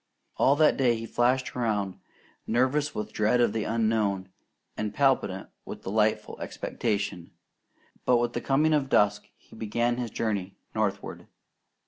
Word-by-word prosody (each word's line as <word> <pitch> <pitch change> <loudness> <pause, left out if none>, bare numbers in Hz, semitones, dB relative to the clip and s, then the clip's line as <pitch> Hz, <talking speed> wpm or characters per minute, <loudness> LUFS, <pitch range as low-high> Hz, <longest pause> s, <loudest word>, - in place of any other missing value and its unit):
All 140 - +4
that 155 0 +4
day 125 -3 +3
he 115 0 -5
flashed 125 +3 +1
around, 105 -6 -1 0.5
nervous 130 +5 +1
with 105 - -4
dread 110 +3 +2
of 120 -3 +3
the 110 - -1
unknown, 110 -4 0 0.5
and 105 -1 -3
palpitant 130 -9 +1
with - - -8
delightful 110 +2 0
expectation; 100 -4 -3 0.7
but 125 - +4
with 120 0 0
the 120 - -2
coming 150 +3 +2
of 140 -3 +1
dusk 105 -3 +2
he - - -18
began 120 +2 0
his 120 -2 -3
journey 100 -4 -2 0.2
northward. - - -2
115 Hz, 140 wpm, -27 LUFS, 105-125 Hz, 0.7 s, All